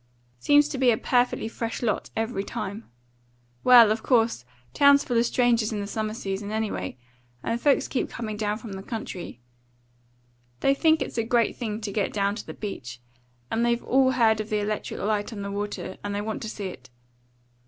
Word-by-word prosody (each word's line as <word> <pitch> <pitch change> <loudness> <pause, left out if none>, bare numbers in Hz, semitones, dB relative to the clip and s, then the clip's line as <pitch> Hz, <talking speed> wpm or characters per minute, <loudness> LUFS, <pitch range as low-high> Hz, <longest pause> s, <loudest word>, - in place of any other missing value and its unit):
Seems 290 - +5
to 270 - -4
be 260 -2 +5
a 225 - +3
perfectly 245 -2 +1
fresh 230 +1 -4
lot 215 -4 -1
every 220 -3 -1
time. 200 +2 -6 0.7
Well, 240 -4 +8
of 220 +1 0
course! 225 - +2 0.3
Town's 280 0 +6
full 245 - -2
of 235 - +3
strangers 235 -3 +2
in 215 - -2
the 200 - -3
summer 215 +1 -3
season, 200 -2 -4
anyway, 215 - -3 0.5
and 230 +1 -2
folks 285 -2 +3
keep 260 - -2
coming 220 -3 -5
down 210 0 -1
from 215 -2 -8
the 190 - -6
country. 190 - -6 1.2
They 275 - +4
think 315 +2 +3
it's - - -5
a - - +2
great 235 -1 +1
thing 220 -3 -4
to 210 -2 -4
get 205 0 -1
down 200 -1 +1
to 215 - -8
the - - -7
beach, 125 - -6 0.5
and 230 - +1
they've 235 0 +1
all 260 0 +3
heard 225 -3 +3
of 215 - -8
the 215 - +1
electric 210 0 -3
light 210 +2 -1
on 205 -3 -6
the 200 - -4
water, 205 +1 -4
and 205 0 -3
they 205 - -1
want 215 +1 -4
to 220 - -4
see 210 -2 -6
it. 130 -9 -8
220 Hz, 195 wpm, -26 LUFS, 205-240 Hz, 1.2 s, Well